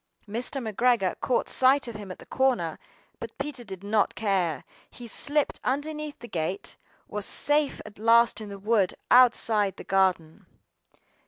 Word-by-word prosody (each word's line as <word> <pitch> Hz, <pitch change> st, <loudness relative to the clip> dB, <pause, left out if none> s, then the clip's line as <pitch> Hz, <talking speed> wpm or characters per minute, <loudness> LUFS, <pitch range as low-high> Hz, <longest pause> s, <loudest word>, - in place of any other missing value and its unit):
Mr. 235 Hz, +6 st, -3 dB
McGregor 220 Hz, -3 st, +1 dB
caught 250 Hz, -, 0 dB
sight 265 Hz, +1 st, +4 dB
of 235 Hz, -, -6 dB
him 210 Hz, -2 st, -9 dB
at 185 Hz, -, -8 dB
the -, -, -14 dB
corner, 245 Hz, -12 st, 0 dB, 0.4 s
but 230 Hz, -, -9 dB
Peter 275 Hz, -3 st, -5 dB
did 190 Hz, -4 st, -9 dB
not 205 Hz, 0 st, +1 dB
care. 185 Hz, -9 st, -1 dB, 0.3 s
He 245 Hz, -, -12 dB
slipped 285 Hz, +5 st, 0 dB
underneath 300 Hz, +2 st, -3 dB
the 240 Hz, -, -11 dB
gate, 180 Hz, +1 st, -4 dB, 0.3 s
and -, -, -22 dB
was 210 Hz, -1 st, -2 dB
safe 295 Hz, -1 st, +2 dB
at 210 Hz, -1 st, -13 dB
last 230 Hz, 0 st, +4 dB
in 210 Hz, -, -8 dB
the 200 Hz, -, -8 dB
wood 205 Hz, -2 st, +1 dB, 0.2 s
outside 225 Hz, -5 st, +4 dB
the -, -, -9 dB
garden. 185 Hz, -4 st, 0 dB
220 Hz, 160 wpm, -26 LUFS, 195-255 Hz, 0.4 s, sight